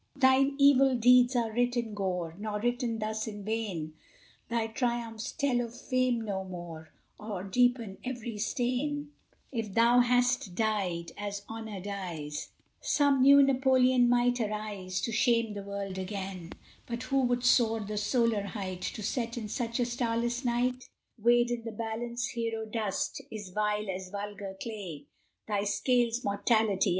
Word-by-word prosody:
Thine 270 0 +4
evil 275 -2 +6
deeds 250 +1 +5
are 230 -2 +1
writ 245 +2 +1
in 230 -3 -2
gore, 180 -5 -2
Nor 210 0 -3
written 240 -1 0
thus 215 0 -3
in 205 -2 -7
vain 200 -8 -3 0.6
Thy 235 -1 0
triumphs 230 -1 -2
tell 260 -4 +1
of 235 +1 -6
fame 255 -3 +1
no 200 -3 -3
more, 175 -4 -8 0.3
Or 210 -4 -5
deepen 235 0 +1
every 240 -4 -5
stain: 275 +6 -1 0.4
If 225 -6 -4
thou 235 +2 +5
hadst 245 -5 +2
died, 190 -6 -1
as 205 -1 -4
honor 220 -3 -6
dies, 180 -7 -5 0.3
Some 285 -2 +2
new 280 +1 +8
Napoleon 260 -2 +4
might 245 0 +3
arise, 210 -4 -3
To 230 - -2
shame 230 -1 +2
the 205 - -5
world 200 -1 -5
again; 190 -2 -5 0.3
But 235 +1 -4
who 275 0 +1
would 245 -1 +1
soar 225 -3 +4
the 210 +1 -5
solar 230 0 +2
height, 190 -2 -5
To 215 - -4
set 235 +2 -2
in 220 -3 -4
such 230 +1 -2
a 245 - +3
starless 240 +1 -1
night? 250 +1 0 0.3
Weighed 240 +2 +4
in 240 -1 -2
the 230 - -5
balance, 235 +2 -3
hero 230 -1 -3
dust 220 +5 -2
Is 210 -5 -7
vile 210 +2 -1
as 185 -1 -4
vulgar 200 -1 -6
clay; 195 -10 -6 0.4
Thy 205 -2 0
scales, 235 +4 +1
Mortality! 205 -1 +2
225 Hz, 150 wpm, -30 LUFS, 200-245 Hz, 0.6 s, new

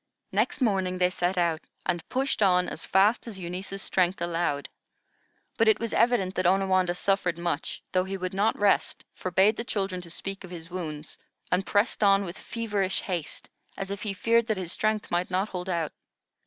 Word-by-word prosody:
Next - - 0
morning, 190 -6 +1
they 180 0 +3
set 180 +1 -1
out 170 -3 +1 0.2
and 175 -2 -2
pushed 265 -2 0
on 180 -2 +4
as - - -4
fast 205 +6 +3
as 215 -4 -5
Eunice's 190 +2 -4
strength 185 0 +1
allowed. 170 -4 -1 0.9
But 225 - +3
it 220 - +5
was 230 -1 -3
evident 230 -6 +3
that 185 -1 +1
Onawandah 185 -1 +3
suffered 180 -2 +1
much, 170 -2 -3
though 185 0 +2
he 195 +1 -4
would 185 0 -4
not 205 +3 +2
rest, 205 -1 +2
forbade 190 +4 +2
the 230 - -2
children 195 -6 -2
to 175 - -10
speak 195 +3 -5
of 185 - -9
his 170 -1 -9
wounds, 155 -4 -6 0.3
and 185 +2 +1
pressed 210 +2 +2
on 200 0 +5
with 170 +1 -7
feverish 205 -5 -1
haste, 175 -5 -4 0.3
as 195 0 -4
if 200 - -4
he 205 -3 -2
feared 230 +3 +2
that 220 -3 0
his 180 -3 -3
strength 215 +1 -1
might 175 +1 0
not 190 +3 0
hold 180 0 -5
out. 170 -3 -1
190 Hz, 190 wpm, -27 LUFS, 180-205 Hz, 0.9 s, it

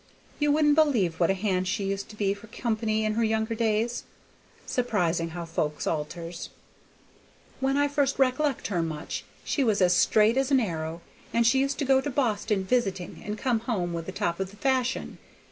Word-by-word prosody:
You 295 -1 +3
wouldn't 295 0 +4
believe 245 - +2
what 170 - +3
a 195 - +3
hand 185 -2 0
she 200 +2 -1
used 195 0 -3
to 215 - -11
be 200 -2 +1
for 205 +2 -13
company 220 -1 -1
in 215 - +1
her 230 +2 +1
younger 220 +1 0
days. 225 +1 0 0.6
Surprisin' 180 -9 0
how 175 -1 -5
folks 155 -2 -2
alters. 165 +2 -4 1.1
When 270 +1 +1
I 285 0 +3
first 285 -1 0
rec'lect 270 +1 +1
her 180 -5 0
much 160 -1 -4 0.2
she 280 - 0
was 220 -4 +2
as 180 -2 +4
straight 215 +6 +4
as 270 0 +2
an 270 -2 +5
arrow, 165 -6 -3 0.3
and 235 0 +2
she 265 +4 +4
used 275 +1 0
to 285 - -1
go 265 0 +4
to 290 - -3
Boston 215 -7 0
visiting 195 -5 -1
and 210 -1 -4
come 240 0 +1
home 200 -7 -2
with 165 -1 -4
the - - -3
top 170 -2 -2
of 190 -1 -2
the 200 - -15
fashion. 260 0 -1
215 Hz, 195 wpm, -27 LUFS, 185-255 Hz, 1.1 s, an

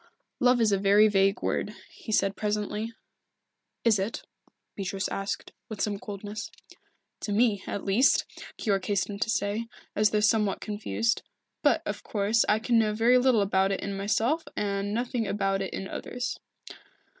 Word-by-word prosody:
"Love 250 0 +4
is 220 -2 +3
a 200 - +2
very 205 +2 +6
vague 195 -1 +2
word," 210 - -1 0.2
he - - -9
said 200 -2 +2
presently. 210 +1 -2 0.9
"Is 220 -4 +4
it?" 200 +5 -3 0.5
Beatrice 195 0 -2
asked, 195 0 -4 0.2
with 215 -3 -6
some 205 -2 -1
coldness. 205 +1 -6 0.7
"To 210 - -4
me, 210 -2 +2
at 200 - -4
least," 205 +7 +4 0.3
Keyork 195 -3 0
hastened 200 0 -1
to 225 - 0
say, 215 +2 -1 0.3
as 210 0 +4
though 210 - +1
somewhat 210 -1 +2
confused. 220 +2 -1 0.4
"But, - - +3
of - - -4
course, 210 +2 +1
I 210 - +4
can 230 +1 +2
know 215 -1 +1
very 240 +3 +5
little 250 -4 +4
about 195 -1 +2
it 195 - -2
in 200 0 -3
myself, 225 +10 +1
and 200 0 -1
nothing 235 0 -1
about 195 -1 0
it 190 - -3
in 195 - -5
others." 245 +4 -4
210 Hz, 160 wpm, -28 LUFS, 200-225 Hz, 0.9 s, very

